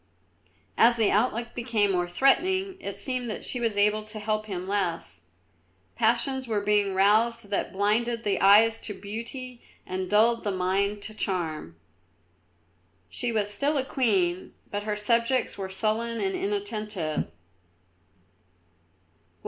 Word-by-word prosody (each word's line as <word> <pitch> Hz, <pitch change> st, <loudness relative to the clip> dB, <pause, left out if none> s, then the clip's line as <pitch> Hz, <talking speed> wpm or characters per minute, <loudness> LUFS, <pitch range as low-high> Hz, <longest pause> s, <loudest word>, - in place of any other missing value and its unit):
As 235 Hz, +1 st, +6 dB
the 220 Hz, -3 st, +3 dB
outlook 235 Hz, +2 st, +1 dB
became 230 Hz, -4 st, +1 dB
more 175 Hz, -1 st, 0 dB
threatening 370 Hz, -, +2 dB
it 200 Hz, -, -5 dB
seemed 250 Hz, +2 st, -2 dB
that 215 Hz, -, -5 dB
she 250 Hz, -, -1 dB
was 225 Hz, -3 st, -1 dB
able 210 Hz, +1 st, +3 dB
to 215 Hz, 0 st, -9 dB
help 215 Hz, 0 st, -2 dB
him 185 Hz, -2 st, -5 dB
less. 185 Hz, -, -2 dB, 0.7 s
Passions 255 Hz, +3 st, +1 dB
were 215 Hz, -2 st, 0 dB
being 205 Hz, -1 st, +1 dB
roused 215 Hz, +2 st, +2 dB
that 200 Hz, -, -1 dB
blinded 230 Hz, +4 st, 0 dB
the 205 Hz, -2 st, 0 dB
eyes 220 Hz, +3 st, +6 dB
to 205 Hz, -, -7 dB
beauty 235 Hz, +5 st, -7 dB, 0.2 s
and 185 Hz, 0 st, -4 dB
dulled 230 Hz, +3 st, +3 dB
the 205 Hz, -, -1 dB
mind 200 Hz, +2 st, 0 dB
to 215 Hz, -, -6 dB
charm. 165 Hz, -, -3 dB, 1.4 s
She 245 Hz, -1 st, -1 dB
was 205 Hz, -2 st, 0 dB
still 285 Hz, +7 st, 0 dB
a 265 Hz, -, 0 dB
queen, 190 Hz, -10 st, 0 dB, 0.2 s
but 205 Hz, 0 st, -3 dB
her 210 Hz, -1 st, -1 dB
subjects 235 Hz, +4 st, +1 dB
were 190 Hz, -1 st, -5 dB
sullen 225 Hz, +4 st, -1 dB
and 385 Hz, 0 st, -1 dB
inattentive. 220 Hz, -, -2 dB
215 Hz, 135 wpm, -27 LUFS, 200-235 Hz, 1.4 s, As